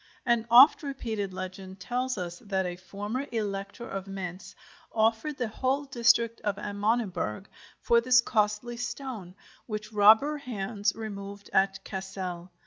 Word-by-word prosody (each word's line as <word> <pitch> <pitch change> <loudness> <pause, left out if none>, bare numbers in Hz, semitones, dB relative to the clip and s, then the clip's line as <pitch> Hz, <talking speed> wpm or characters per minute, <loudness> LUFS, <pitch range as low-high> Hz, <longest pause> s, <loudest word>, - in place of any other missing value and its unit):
An 235 -2 +2
oft 255 +6 +8
repeated 225 -9 -3
legend 185 +1 -7
tells 250 +6 -2
us 175 -1 -5
that 195 -4 -1
a 175 -1 -3
former 205 +9 -5
Elector 205 0 -4
of 195 0 -5
Mainz 190 -1 -7 0.4
offered 225 +7 +1
the 245 - -1
whole 260 +6 -1
district 235 -3 +3
of 205 -2 -1
Amöneberg 205 - -1 0.3
for 235 0 +3
this 245 0 +5
costly 220 +1 0
stone, 235 -6 -5 0.3
which 215 -1 -5
robber 220 +9 +6
hands 205 -5 -2
removed 200 -2 -7
at 195 0 +2
Cassel. 190 -2 -5
210 Hz, 135 wpm, -28 LUFS, 195-235 Hz, 0.4 s, oft